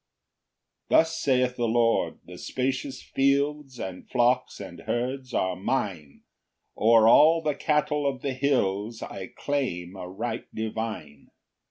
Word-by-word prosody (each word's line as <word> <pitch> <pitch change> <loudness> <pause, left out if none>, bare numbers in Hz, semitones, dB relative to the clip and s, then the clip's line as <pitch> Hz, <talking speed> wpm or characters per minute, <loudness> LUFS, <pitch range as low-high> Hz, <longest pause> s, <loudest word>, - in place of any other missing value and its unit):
1 - - +4
Thus 160 0 +1
saith 125 -2 +1
the 120 -1 0
Lord, 115 0 +1
"the 90 0 -11
spacious 130 +1 -3
fields 140 -1 0
"And 95 -1 -7
flocks 125 +1 +1
and 95 -4 -9
herds 130 +2 -2
are 95 -5 0
mine 95 - -3 0.5
"O'er 110 0 +5
all 160 +7 +6
the 150 -1 +1
cattle 150 0 0
of 135 -2 -3
the 140 - -1
hills 115 -5 0
"I 95 -1 -7
claim 100 -11 -3
a 90 -1 -7
right 110 +6 -4
divine. 110 -10 -5
120 Hz, 135 wpm, -26 LUFS, 100-140 Hz, 0.5 s, all